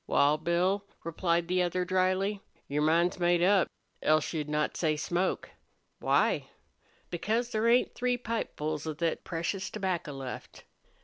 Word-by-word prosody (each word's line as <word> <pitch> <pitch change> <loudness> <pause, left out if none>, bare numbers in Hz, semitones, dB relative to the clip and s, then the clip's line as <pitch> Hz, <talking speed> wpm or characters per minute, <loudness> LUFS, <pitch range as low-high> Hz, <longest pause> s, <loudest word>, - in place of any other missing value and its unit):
"Wal, 145 +2 +3
Bill," 180 +5 +1 0.2
replied 170 0 0
the 180 +1 +2
other, 180 +1 0
dryly, 185 +2 +1 0.3
"your 145 +1 -1
mind's 170 +4 +2
made 175 0 +3
up, 190 0 +4 0.3
else 155 +1 +2
you'd 150 -2 -2
not 150 0 0
say 155 -3 +1
smoke." 175 +5 -1 0.5
"Why?" - - +2 0.6
"Because 225 +7 -1
there 220 +1 +1
ain't 240 +2 +4
three 250 0 0
pipefuls 155 - -3
of 155 -2 -4
thet 165 -1 -1
precious 180 +3 -3
tobacco 185 -7 -2
left." 135 -2 -7
175 Hz, 140 wpm, -30 LUFS, 155-195 Hz, 0.6 s, up